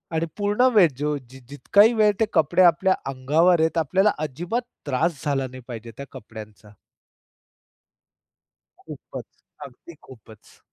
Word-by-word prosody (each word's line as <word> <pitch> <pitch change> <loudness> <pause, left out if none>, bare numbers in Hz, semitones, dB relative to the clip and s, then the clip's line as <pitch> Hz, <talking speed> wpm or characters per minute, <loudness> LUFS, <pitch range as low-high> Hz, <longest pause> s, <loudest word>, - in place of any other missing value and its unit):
आणि 160 +1 0
पूर्ण 205 +5 +2
वेळ 200 -6 +6
जो 150 +1 -2
जि 130 +1 -14
जितकाही 205 +10 +3
वेळ 215 -2 +3
ते 220 - +3
कपडे 170 +2 +2
आपल्या 180 +2 +3 0.2
अंगावर 155 +7 +2
आहेत, 160 +1 0
आपल्याला 190 +6 +2
अजिबात 170 - -3 0.2
त्रास 145 +2 -2
झाला 135 -2 -1
नाही 130 0 -12
पाहिजे 115 -2 -9
त्या 140 - -7
कपड्यांचा. 105 -1 -12 2.1
खूपच, - - -12 0.2
अगदी 140 +5 -14
खूपच. 110 -4 -17
155 Hz, 130 wpm, -23 LUFS, 130-185 Hz, 2.1 s, वेळ